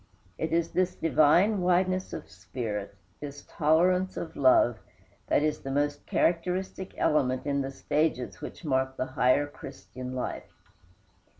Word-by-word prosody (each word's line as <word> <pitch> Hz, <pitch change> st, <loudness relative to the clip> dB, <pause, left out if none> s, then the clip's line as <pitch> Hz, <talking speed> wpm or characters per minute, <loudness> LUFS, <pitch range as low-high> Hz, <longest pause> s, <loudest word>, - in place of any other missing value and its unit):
It 160 Hz, -, -2 dB
is 165 Hz, 0 st, +1 dB
this 185 Hz, 0 st, 0 dB
divine 170 Hz, +6 st, +4 dB
wideness 185 Hz, +1 st, +1 dB
of -, -, -7 dB
spirit, 105 Hz, +1 st, -5 dB, 0.2 s
this 145 Hz, -1 st, -8 dB
tolerance 180 Hz, +4 st, +2 dB
of 160 Hz, -1 st, -5 dB
love, 125 Hz, -4 st, +4 dB, 0.5 s
that 145 Hz, -, +2 dB
is 155 Hz, -1 st, 0 dB
the 135 Hz, -, -7 dB
most 145 Hz, +1 st, -1 dB
characteristic 180 Hz, +2 st, -1 dB
element 130 Hz, -4 st, +1 dB
in 140 Hz, -1 st, 0 dB
the 135 Hz, -, -3 dB
stages 145 Hz, -1 st, -1 dB
which -, -, -8 dB
mark 130 Hz, -2 st, 0 dB
the -, -, -1 dB
higher 130 Hz, +1 st, +2 dB
Christian 130 Hz, -2 st, -9 dB
life. 125 Hz, -, -6 dB
145 Hz, 135 wpm, -28 LUFS, 130-175 Hz, 0.5 s, divine